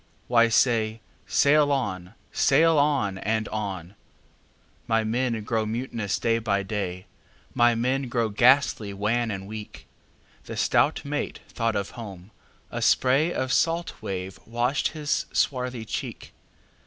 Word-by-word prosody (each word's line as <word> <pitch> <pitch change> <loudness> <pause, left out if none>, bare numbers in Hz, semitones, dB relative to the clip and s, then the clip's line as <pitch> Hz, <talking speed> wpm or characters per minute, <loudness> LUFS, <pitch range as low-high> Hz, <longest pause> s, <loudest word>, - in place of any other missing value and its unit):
"Why, 115 -1 +5
say, 115 -2 +2 0.3
'Sail 145 0 +4
on! 95 -8 -2 0.2
sail 160 +2 +4
on! 135 -10 +1
and 110 +1 -1
on!'""My 105 +3 -6
men 115 0 -1
grow 110 +1 0
mutinous 115 -3 -2
day 115 0 +1
by 100 -3 0
day; 95 -3 -4 0.5
My 120 0 +4
men 130 +3 0
grow 115 -2 0
ghastly 110 -2 +3
wan 115 +4 0
and 95 -2 -4
weak."The 105 +1 -11
stout - - +2
mate 145 +1 -3
thought 115 -2 -1
of 100 -1 -2
home; 100 -4 -10 0.4
a - - -3
sprayOf 130 0 +2
salt 165 +4 +1
wave 95 0 -5
washed 120 +4 0
his 150 -2 -2
swarthy 125 -3 -1
cheek. - - -6
115 Hz, 120 wpm, -25 LUFS, 105-130 Hz, 0.5 s, Why